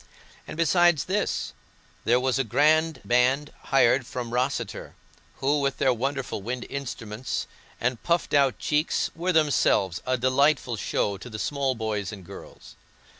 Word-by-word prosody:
And, - - -7
besides 170 -2 +4
this, 200 +2 -1 0.5
there 120 +2 +4
was 130 +1 0
a - - +3
grand 155 +7 +2
band 130 +4 +2
hired 130 -1 +3
from 120 -2 -5
Rosseter, 125 -3 -2 0.4
who, 145 +2 +1
with 140 -1 -1
their 130 - +3
wonderful 130 -2 -3
wind 120 +4 -4
instruments 125 -4 -4 0.3
and 125 0 -1
puffed 170 0 0
out 140 -3 +3
cheeks, 150 +2 0
were 175 +3 0
themselves 145 - +2
a 130 0 +2
delightful 130 0 +2
show 100 -1 -1
to 125 - -9
the 110 - -6
small 135 +2 -1
boys 105 -4 -3
and 100 -4 -10
girls. - - -12
130 Hz, 145 wpm, -26 LUFS, 120-145 Hz, 0.5 s, besides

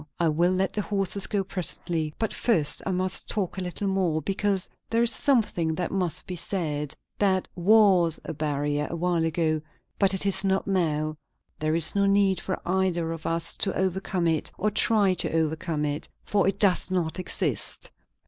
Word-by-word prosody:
"I 170 -2 +3
will 170 +3 +2
let 190 +1 0
the 210 - -1
horses 195 -1 -1
go 200 -2 0
presently; 170 -4 -3
but 225 - -2
first 160 -12 +1
I - - 0
must 185 0 -2
talk 195 -2 -2
a - - -3
little 180 +3 -3
more, 185 -5 +1
because 195 +3 -1 0.2
there 230 +1 +2
is 235 - +6
something 210 - +1
that 175 0 -3
must 185 -4 -2
be 180 - -5
said. 150 -5 -3 0.2
That 190 -2 +2
was 185 -3 +4
a - - -4
barrier, 145 -1 -1
a - - -4
while 170 0 0
ago; 160 -1 0 0.4
but 195 -1 +3
it 190 - +1
is 195 0 +5
not 190 0 +1
now. 155 -5 0 0.4
There 155 +1 0
is 165 -1 +4
no 200 0 +2
need 195 -1 +3
for 185 - -3
either 175 -2 0
of 165 -1 -5
us 165 0 -2
to 195 - 0
overcome 190 -1 -1
it 160 -2 0
or 210 +2 0
try 205 -2 +4
to 180 - -2
overcome 160 -1 -1
it, 145 0 -3
for 200 -2 +1
it 195 0 0
does 195 -3 +2
not 180 -2 -1
exist. - - 0
180 Hz, 185 wpm, -26 LUFS, 160-195 Hz, 0.4 s, is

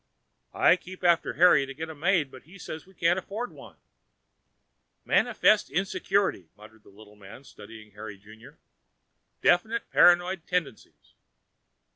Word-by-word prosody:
"I 180 - +4
keep 185 +1 -13
after 170 -2 +2
Harry 170 -4 +4
to 135 - -9
get 160 +3 -6
a - - -9
maid, 160 -2 0
but 130 - -13
he 175 +7 -16
says 160 -2 -9
we 190 - -21
can't 170 +2 +1
afford 215 +6 -6
one." - - -14 1.3
"Manifestly 210 -8 +2
insecure," 195 +1 0 0.2
muttered 110 +1 -17
the - - -20
little 105 +1 -17
man, 105 +5 -14
studying 110 -3 -14
Harry 105 0 -10
Junior. 105 +3 -16 0.9
"Definite 220 +7 +1
paranoid 175 0 +3
tendencies." 180 - -5
165 Hz, 135 wpm, -26 LUFS, 110-185 Hz, 1.3 s, I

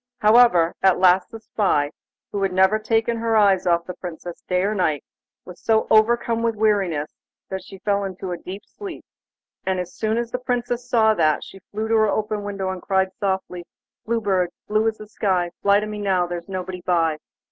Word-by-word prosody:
However, 210 -7 +5
at 190 -1 +4
last 185 0 +4
the 225 - -9
spy, 185 -10 0 0.4
who 200 - -3
had 195 -1 +1
never 190 +3 +3
taken 225 +1 0
her 225 -1 +1
eyes 195 -3 +4
off 170 -1 +2
the 180 - -6
Princess 175 -1 -8
day 180 0 +2
or 205 +2 +1
night, 155 -8 0 0.4
was 180 -1 -12
so 220 -1 +2
overcome 230 +1 +3
with 230 -1 0
weariness 195 -8 0 0.4
that 190 0 -4
she 195 - -11
fell 200 +1 0
into 190 -1 -5
a 175 - -3
deep 195 +4 -8
sleep, 395 -5 -9 0.6
and 190 -1 -1
as 180 -1 -6
son 220 0 -1
as 235 0 -2
the 250 - -2
Princess 245 -1 -2
saw 220 -3 +4
that, 155 -7 +2
she 195 - -12
flew 215 +2 -3
to 225 - 0
open 215 0 +1
her - - -7
window 195 -2 -3
and 185 -1 -6
cried 190 -1 0
softly: 190 -3 -2 0.4
'Blue 230 0 -1
Bird, 190 -4 +1 0.2
blue 215 +1 +2
as 220 -1 -1
the 215 - -10
sky, 185 -4 -1
Fly 200 0 +4
to 210 - -3
me 210 0 -6
now, 190 -3 +1
there's 175 +1 -6
nobody 185 -1 -5
by. 165 -3 +1
200 Hz, 200 wpm, -22 LUFS, 180-220 Hz, 0.6 s, However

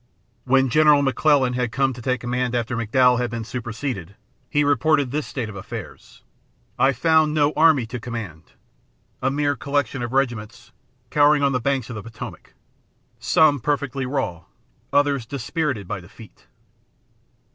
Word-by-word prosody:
When 130 +1 +3
General 150 -1 +5
McClellan 135 -2 +2
came 125 +2 0
to 120 - -10
take 130 +2 -1
command 125 0 -1
after 120 +1 -1
McDowell 125 +2 +3
had 125 -1 -1
been 115 0 -4
superseded, 115 - -5 0.3
he 145 -1 +2
reported 145 -1 +2
this 150 +1 -2
state 125 -5 -4
of 105 - -9
affairs: 95 - -9 0.6
"I 135 - +5
found 155 +1 +2
no 150 0 +2
army 155 -6 +4
to 120 +2 -6
command 105 -9 -7 0.7
a - - +1
mere 145 +1 0
collection 140 0 -2
of 120 -1 -4
regiments 120 -3 -2 0.4
cowering 145 0 +4
on 140 - +3
the 125 - 0
banks 130 -2 -1
of - - -6
the - - -5
Potomac, 115 +2 -10 0.6
some 150 -3 +3
perfectly 135 0 -2
raw, 130 - -3 0.5
others 145 -3 +2
dispirited 135 - -3
by 105 0 -4
defeat." 105 +5 -16
130 Hz, 145 wpm, -22 LUFS, 115-145 Hz, 0.7 s, General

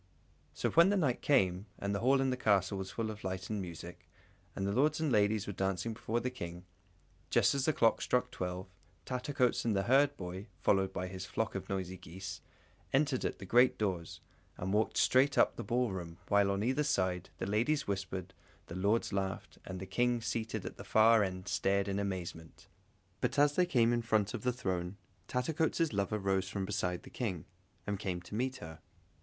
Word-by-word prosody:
So - - 0
when 170 +3 +6
night 165 -12 +1
came, 95 -8 +2
and 100 0 -2
the 100 - 0
hall 135 +4 +4
in 135 -1 +1
the - - 0
castle 100 -5 +2
was 95 0 -4
full 110 +3 -3
of 105 -1 -10
light 95 +1 -4
and 105 -2 -1
music, 85 -1 -9 0.5
and 95 - -2
the 100 - 0
lords 150 +8 +2
and 155 -3 0
ladies 105 -1 +3
were 100 - -4
dancing 95 +4 -1
before 115 +1 -2
the 125 +2 -2
King, 90 -6 -7 0.6
just - - +4
as 140 -1 0
the - - +4
clock 115 -5 +3
struck 125 - +1
twelve, 90 +1 -4 0.4
Tattercoats 125 0 0
and 115 -3 +1
the 95 - +1
herdboy, 110 -7 +1
followed 95 +3 +2
by 90 - -3
his 95 -1 -6
flock - - -2
of - - -5
noisy 95 -1 -3
geese, 90 0 -8 0.5
entered 135 -1 +2
at - - -2
the 100 - -9
great 125 +6 +5
doors, 90 -6 -2 0.4
and 95 +2 -2
walked 110 +1 +1
straight 130 +2 +4
up - - +4
the - - -5
ball 125 -2 0
room, 85 -3 -6
while 100 -1 +4
on 100 +1 0
either 130 +5 +1
side 95 - 0
the - - -3
ladies 120 +9 +1
whispered, 95 -2 -3 0.3
the 85 - -8
lords 100 +3 +1
laughed, 95 -2 -3
and 95 -1 -6
the 95 - -5
King 120 +5 +1
seated 115 0 -3
at - - -6
the - - -8
far 110 0 +5
end 95 -1 -4
stared 100 0 +1
in 100 0 -1
amazement. 90 -5 -5 0.5
But - - -1
as 145 0 +5
they 180 +3 +3
came 120 -8 +3
in 120 - +1
front 110 -2 +1
of 120 - -4
the 125 - +1
throne, 95 -6 -3 0.3
Tattercoats' 160 +3 0
lover 100 +1 0
rose 95 -1 0
from 95 0 -2
beside 95 -3 -2
the - - -13
King, 95 - -3 0.4
and 100 -1 -2
came 95 -4 -2
to 90 - -12
meet 130 +4 -1
her. 80 -9 -9
100 Hz, 200 wpm, -33 LUFS, 95-125 Hz, 0.6 s, when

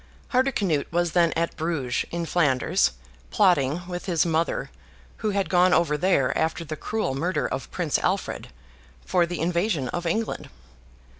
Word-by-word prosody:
Hardicanute 210 - +1
was 175 0 +1
then 170 -1 +3
at 165 +1 -1
Bruges, 155 -7 -1
in 170 0 -3
Flanders, 145 - +2 0.4
plotting, 175 -4 +2
with 180 +1 -6
his 170 -3 +2
mother 165 0 -1 0.5
(who 215 - -1
had 200 -3 0
gone 180 +2 +4
over 165 -3 +2
there 150 -5 +2
after 160 +1 -1
the 155 0 -5
cruel 215 -3 -2
murder 170 +7 -1
of - - -5
Prince - - 0
Alfred), - - -2 0.6
for 175 -2 +2
the 175 -1 -4
invasion 170 - 0
of 175 0 -3
England. 220 +6 -2
170 Hz, 150 wpm, -25 LUFS, 155-180 Hz, 0.6 s, gone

